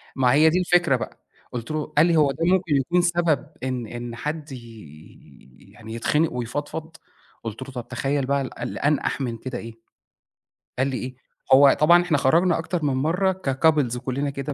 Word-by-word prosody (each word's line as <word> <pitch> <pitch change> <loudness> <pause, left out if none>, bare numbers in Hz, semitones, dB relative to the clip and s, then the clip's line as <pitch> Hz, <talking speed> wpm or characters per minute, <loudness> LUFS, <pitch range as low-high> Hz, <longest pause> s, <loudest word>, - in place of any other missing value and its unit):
ما 125 -2 +3
هي 155 +3 +6
دي 175 +3 +1
الفكرة 175 -6 +3
بقى، 120 - -7 0.3
قُلت 120 +3 -5
له 155 -1 -2
قال 155 - +7
لي: 170 -1 +2
"هو 145 -3 +4
ده 165 +4 -2
ممكن 180 -3 +2
يكون 170 +7 +2
سبب 170 -3 +1 0.2
إن 130 -3 -3
إن 120 +1 -7
حد 150 +3 -5
ي 80 - -14
يعني 110 +1 -11
يتخنَق 150 +7 0
ويفضفض؟"، 145 +6 -5 0.5
قُلت 115 +1 -6
له: 135 +1 -7
"طب 125 -3 -7
تخيّل 135 +2 -1
بقى 140 +1 0
ال 130 - -7
اللي - - -5
أنقح 145 -1 0
من 120 -3 -3
كده 125 +2 -6
إيه؟"، 115 -1 -8 1.0
قال 130 - +2
لي: 135 -2 -2
"إيه؟"، 130 +1 -6 0.4
هو 140 +1 +8
طبعًا 170 +3 +6
إحنا 170 -4 +1
خرجنا 165 +6 +3
أكتر 165 0 -3
من 140 - +1
مرّة 180 +8 0
كcouples 135 -2 +2
كلّنا 135 +3 -2
كده 140 +1 -5
140 Hz, 185 wpm, -23 LUFS, 125-160 Hz, 1.0 s, هو